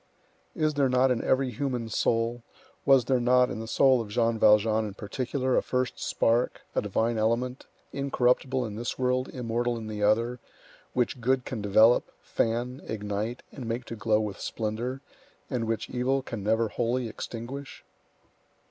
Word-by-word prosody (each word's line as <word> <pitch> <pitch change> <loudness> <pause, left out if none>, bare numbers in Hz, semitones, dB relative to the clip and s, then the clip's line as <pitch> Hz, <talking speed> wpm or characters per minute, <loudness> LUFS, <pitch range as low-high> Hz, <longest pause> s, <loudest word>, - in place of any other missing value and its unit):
Is 155 -3 +1
there 140 -2 +2
not 125 +1 +3
in 120 - 0
every 130 -1 +2
human 125 -1 -2
soul, 115 +2 0 0.5
was 135 -3 +6
there 130 -2 +2
not 125 +1 +4
in - - -4
the 110 - -6
soul 130 +1 +4
of 110 - -7
Jean 115 +1 +1
Valjean 110 +1 +4
in 105 -2 -6
particular, 130 +5 -2
a - - +4
first 125 0 -2
spark, 115 +2 +1
a - - +1
divine 115 0 0
element, 120 +4 -1 0.3
incorruptible 130 -1 +1
in 105 -1 -6
this 120 +1 -3
world, 130 0 0
immortal 120 0 -2
in 115 - -6
the 105 -1 -5
other, 115 +4 +2 0.5
which 125 +1 0
good 130 +2 +1
can 115 -5 -4
develop, 110 +4 +4
fan, 120 +4 -1
ignite, 105 +2 -3
and 130 -5 -7
make 120 +2 -3
to 115 - -6
glow 105 0 +2
with 105 -2 -4
splendor, 115 +4 -3 0.5
and 120 -4 -1
which 115 -1 -2
evil 130 +2 0
can 115 -5 -6
never 110 +2 +1
wholly 120 +2 -1
extinguish? 120 +5 -7
120 Hz, 165 wpm, -27 LUFS, 110-130 Hz, 0.5 s, was